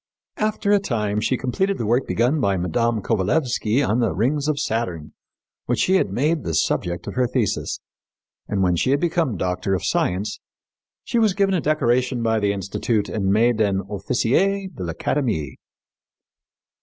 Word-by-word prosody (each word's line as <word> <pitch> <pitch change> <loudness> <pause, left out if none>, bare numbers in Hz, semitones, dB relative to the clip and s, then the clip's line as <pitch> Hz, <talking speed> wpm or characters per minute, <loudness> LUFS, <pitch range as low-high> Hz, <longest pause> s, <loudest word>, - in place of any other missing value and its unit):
After 215 -1 0
a 205 - +5
time 105 - -1
she 130 +4 +1
completed 190 +11 -1
the 115 - -3
work 120 +5 +1
begun 125 +7 +1
by 100 -5 +1
Mme. 110 +5 0
Kovalévsky 115 - +1
on 110 +4 +1
the 115 -3 +1
rings 140 +8 0
of 150 -2 0
Saturn, 90 -9 -3 0.5
which - - +1
she 190 +1 +3
made 145 - 0
the 80 -2 -2
subject 85 +2 0
of - - -5
her 125 -1 +1
thesis, 120 -4 -1 0.7
and, 100 -2 0
when 90 -1 +2
she 85 - 0
had 140 +1 +3
become 165 - 0
Doctor 90 +2 -1
of 90 - -3
Science, 100 +3 -1 0.6
she 235 - 0
was 215 -4 +3
given 195 -1 +2
a 180 - +1
decoration 130 -4 +1
by 115 -1 +2
the 100 -1 +1
Institute 100 +2 -1
and 95 -3 0
made 110 +2 +3
an 100 -2 +1
Officier 125 - 0
de 95 - -5
l'Académie." 85 - -2
115 Hz, 165 wpm, -22 LUFS, 100-145 Hz, 0.7 s, a